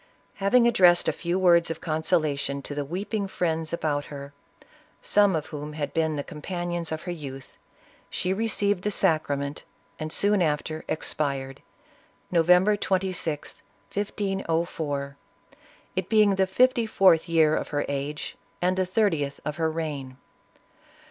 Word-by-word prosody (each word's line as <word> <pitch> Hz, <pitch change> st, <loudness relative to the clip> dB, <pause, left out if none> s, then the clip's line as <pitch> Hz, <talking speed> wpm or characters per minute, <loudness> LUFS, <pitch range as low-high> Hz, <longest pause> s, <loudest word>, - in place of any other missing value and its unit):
Having 235 Hz, +5 st, +4 dB
addressed 180 Hz, -6 st, +5 dB
a -, -, +4 dB
few 175 Hz, +1 st, -2 dB
words 170 Hz, -3 st, +4 dB
of 165 Hz, -, -4 dB
consolation 155 Hz, -4 st, 0 dB
to 145 Hz, -, -6 dB
the 145 Hz, 0 st, -2 dB
weeping 195 Hz, +7 st, -3 dB
friends 165 Hz, -4 st, -2 dB
about 150 Hz, -3 st, -1 dB
her, 140 Hz, 0 st, -9 dB, 0.7 s
some 205 Hz, -3 st, +4 dB
of 155 Hz, -1 st, -2 dB
whom 150 Hz, 0 st, -5 dB
had 145 Hz, -2 st, -4 dB
been 160 Hz, -1 st, +1 dB
the 145 Hz, -, -3 dB
companions 175 Hz, +2 st, -4 dB
of 160 Hz, 0 st, -4 dB
her 180 Hz, -, -4 dB
youth, 135 Hz, -5 st, -8 dB, 0.5 s
she 185 Hz, -, -1 dB
received 205 Hz, -2 st, 0 dB
the 210 Hz, -, +1 dB
Sacrament, 145 Hz, -6 st, 0 dB, 0.4 s
and 155 Hz, 0 st, -4 dB
soon 205 Hz, +2 st, +3 dB
after 155 Hz, 0 st, -1 dB
expired, 140 Hz, -4 st, -3 dB, 0.7 s
November 180 Hz, +4 st, +5 dB
26th, 185 Hz, -6 st, -2 dB, 0.3 s
1504, 165 Hz, -8 st, -2 dB, 0.8 s
it 185 Hz, 0 st, -2 dB
being 215 Hz, -2 st, +5 dB
the 190 Hz, 0 st, +2 dB
fifty 245 Hz, +3 st, +3 dB
fourth 185 Hz, -5 st, +4 dB
year 160 Hz, -2 st, +4 dB
of -, -, -2 dB
her 145 Hz, -1 st, -1 dB
age 140 Hz, +1 st, -4 dB, 0.2 s
and 180 Hz, +1 st, +1 dB
the 185 Hz, -1 st, +1 dB
thirtieth 170 Hz, -9 st, 0 dB
of 150 Hz, +1 st, -3 dB
her 160 Hz, -1 st, +1 dB
reign. 145 Hz, -5 st, -4 dB
165 Hz, 140 wpm, -26 LUFS, 150-190 Hz, 0.8 s, addressed